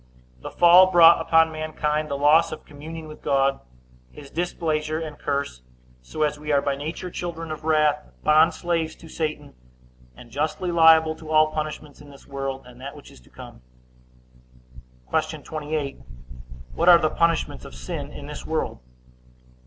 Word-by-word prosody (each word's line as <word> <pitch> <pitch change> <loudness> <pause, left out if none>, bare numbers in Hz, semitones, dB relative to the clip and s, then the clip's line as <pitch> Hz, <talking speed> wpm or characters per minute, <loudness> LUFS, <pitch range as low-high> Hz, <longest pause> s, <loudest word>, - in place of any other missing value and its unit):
The - - -8
fall 180 +2 +6
brought 170 -2 +7
upon 160 0 +3
mankind 155 -1 -2
the 140 - -2
loss 150 +4 +4
of - - -8
communion 155 +2 -9
with 155 - -12
God, 135 0 +1 0.5
his 140 -2 -13
displeasure 155 -2 -2
and 155 -2 -6
curse; 140 - -3 0.4
so 155 - -4
as 150 -1 -1
we 150 0 -4
are 140 - +4
by 140 0 -1
nature 160 +5 -6
children 165 -2 -6
of 155 0 -7
wrath, 150 -1 +2 0.2
bond 155 +2 +4
slaves 165 -2 -2
to 165 - -15
Satan, 155 -1 -4 0.6
and 120 - -14
justly 155 +6 -2
liable 160 -1 +5
to 160 -1 -12
all 155 0 +4
punishments 155 -1 -6
in 145 - -14
this 140 -1 -16
world, 135 -1 -5
and 125 0 -15
that 140 +2 -8
which 145 - -14
is - - -17
to 60 - -22
come. - - -13 1.5
Q. - - -1
28. 150 -2 -4 0.7
What 170 +2 +2
are 175 - +9
the 155 -2 0
punishments 165 -1 0
of - - -11
sin 65 0 -6
in - - -9
this - - -8
world? - - -3
155 Hz, 165 wpm, -23 LUFS, 145-160 Hz, 1.5 s, are